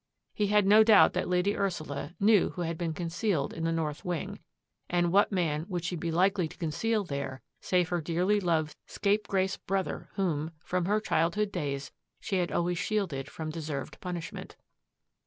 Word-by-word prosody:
He 210 - 0
had 210 0 +4
no 210 +2 +7
doubt 215 -2 +7
that - - -1
Lady 180 +3 +2
Ursula 170 -5 -3
knew 205 -1 +5
who 180 - -2
had 165 0 -2
been 165 0 -2
concealed 170 -1 -1
in 165 - -3
the 165 - +1
north 155 -3 -2
wing, 175 -3 -3 0.5
and 175 -1 +2
what 200 +3 +4
man 165 -5 0
would 175 -3 -2
she 175 +1 -2
be 170 0 -3
likely 180 +1 +2
to - - -14
conceal 210 +7 0
there 140 -5 -5 0.2
save 180 -2 +1
her 175 -1 0
dearly 180 +6 +1
loved 160 -5 0
scapegrace 200 -2 0
brother 195 -1 -3
whom, 160 -4 -1
from 180 -1 0
her 210 +3 +2
childhood 200 +1 +1
days, 140 -6 -3 0.3
she 195 - -2
had 175 -1 0
always 175 0 0
shielded 190 -10 -1
from 155 -1 -5
deserved 155 -4 -5
punishment? 175 -3 -6
175 Hz, 175 wpm, -29 LUFS, 160-195 Hz, 0.5 s, no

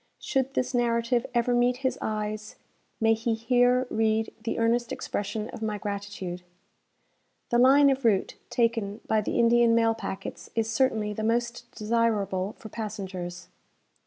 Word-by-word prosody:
Should 270 0 -1
this 255 - 0
narrative 235 0 +1
ever 240 +1 +2
meet 245 +1 +3
his 260 - 0
eyes, 215 0 -3 0.4
may 225 0 +4
he 225 +1 -1
here 245 +2 +3
read 220 0 +1
the 230 - -2
earnest 230 +1 +1
expression 210 +1 -3
of - - -9
my 215 -1 -2
gratitude. 200 -3 -5 1.1
The 240 - +3
line 275 +3 +6
of 270 0 -2
route 210 -5 +2 0.2
taken 225 -3 0
by 220 -1 +2
the - - -2
Indian 235 0 +5
mail 230 -1 +3
packets 225 -3 -6
is 225 -1 +1
certainly 225 -3 +1
the 220 - -5
most 240 +2 -1
desirable 210 -3 0
for - - -10
passengers. 190 -5 -6
225 Hz, 145 wpm, -27 LUFS, 210-240 Hz, 1.1 s, line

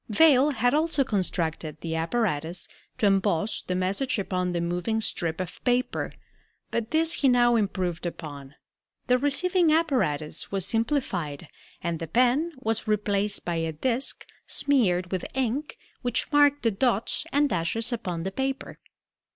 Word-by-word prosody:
Vail 280 +3 +5
had 245 -3 +1
also 310 -1 +2
constructed 165 - -2
the 165 -1 -3
apparatus 165 -2 -1 0.3
to - - +1
emboss 195 0 +2
the 180 - -3
message 195 +9 0
upon 180 -2 -1
the 175 - -1
moving 180 +6 -1
strip 165 -6 -1
of 185 0 -6
paper, 250 0 0 0.6
but 235 -1 -2
this 320 +2 +4
he 275 - +3
now 240 -1 +4
improved 185 -5 -1
upon. 145 -4 -8 0.5
The 250 0 +3
receiving 340 +5 +2
apparatus 255 - 0
was 195 -2 0
simplified 195 - -1 0.3
and 170 -2 -2
the 165 - -5
pen 255 - +2
was 225 -3 -2
replaced 210 -1 0
by 175 -1 -1
a 165 -1 -2
disk 245 - -1 0.2
smeared 185 -11 +1
with 185 -2 -2
ink 265 - -2 0.2
which 245 +4 -1
marked 290 -1 +4
the 230 - +3
dots 230 +7 0
and 290 +1 +3
dashes 225 +5 -1
upon 180 -8 -3
the 190 - -3
paper. 265 +4 -3
215 Hz, 145 wpm, -26 LUFS, 175-265 Hz, 0.6 s, Vail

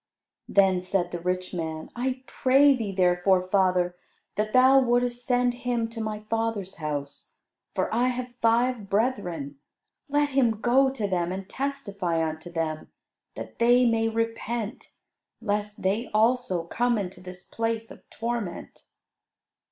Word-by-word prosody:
Then 190 -2 +4
said 185 -1 -1
the 175 - -4
rich 180 +2 -2
man, 160 -2 -4
"I 255 +1 -2
pray 275 +3 +4
thee 220 -5 -3
therefore, 185 0 +2
father, 185 -2 +2 0.4
that 215 0 -1
thou 260 +2 +6
wouldest 245 -1 +1
send 245 -1 +2
him 240 -2 0
to 230 0 -6
my 215 -1 -3
father's 220 -3 -2
house; 145 -3 -5 0.4
for - - -1
I 240 +3 +2
have 250 -1 -3
five 230 -2 +2
brethren. 180 - -1 0.5
Let 290 0 +2
him 245 -6 +2
go 260 +4 +4
to 230 -6 -3
them 175 -2 -1
and 190 0 -5
testify 200 -13 -2
unto 160 +2 -6
them, 160 -2 -3 0.5
that - - -8
they 245 +2 +5
may 225 -1 +2
repent, 230 0 -3 0.5
lest 210 0 -3
they 205 +6 0
also 225 -6 +2
come 240 +6 +1
into 180 -3 -5
this 180 0 -10
place 225 0 -3
of - - -15
torment." 230 -6 -5
215 Hz, 140 wpm, -26 LUFS, 180-245 Hz, 0.5 s, thou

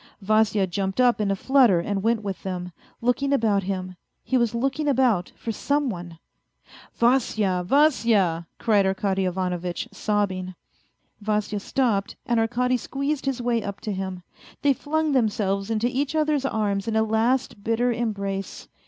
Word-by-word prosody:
Vasya 215 0 +2
jumped 190 +3 -3
up 245 -3 +4
in 205 - 0
a 195 - +1
flutter 245 -4 +4
and 195 +3 -2
went 225 +1 +1
with 195 -2 -4
them, 180 -2 -5 0.3
looking 250 +4 +1
about 220 -7 +2
him. 185 -1 -4 0.3
He 260 - -1
was 235 -2 +2
looking 270 +5 -1
about 250 -10 +2
for 230 - -4
some 285 +5 0
one. 175 -3 -8 0.4
" - - -22
Vasya, 220 -6 +2
Vasya! 210 - +3
" - - -51
cried 205 -4 +3
Arkady 190 0 0
Ivanovitch, 180 +1 -2
sobbing. 190 -3 -1 0.7
Vasya 210 0 -1
stopped, 210 -3 0
and 235 -1 +1
Arkady 250 +3 +1
squeezed 275 +3 -3
his 260 -2 -1
way 235 -1 +1
up 200 -1 -6
to 215 - -3
him. 190 -2 -4 0.4
They 285 -1 +5
flung 310 +3 -1
themselves 205 -5 0
into 225 0 0
each 275 +4 -1
other's 300 -3 +1
arms 200 -4 -1
in 225 - -1
a 220 - +4
last 220 0 0
bitter 235 +3 +1
embrace. 200 -4 -4
215 Hz, 160 wpm, -24 LUFS, 195-250 Hz, 0.7 s, They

